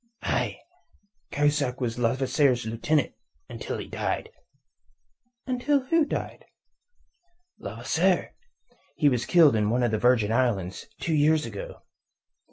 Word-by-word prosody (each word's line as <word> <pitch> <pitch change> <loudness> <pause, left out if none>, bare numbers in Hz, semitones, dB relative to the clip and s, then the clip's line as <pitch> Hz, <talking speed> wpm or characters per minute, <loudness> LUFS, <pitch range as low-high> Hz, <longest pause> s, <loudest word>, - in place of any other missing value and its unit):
"Aye. - - -1 0.7
Cahusac 145 -3 0
was 120 -2 -3
Levasseur's 130 +1 +1
lieutenant, 125 +7 0 0.3
until - - -5
he - - -7
died." - - -3 1.1
"Until 270 +3 +1
who 315 +4 +2
died?" - - -5 1.1
"Levasseur. - - 0 0.6
He 145 - +3
was 125 -3 -1
killed 160 -8 +6
on 105 -1 +1
one 125 +2 +1
of 120 - +1
the 110 - 0
Virgin 120 -3 +3
Islands 110 - -1
two 165 - -2
years 155 +1 +3
ago." 105 -4 -8
130 Hz, 115 wpm, -26 LUFS, 115-155 Hz, 1.1 s, killed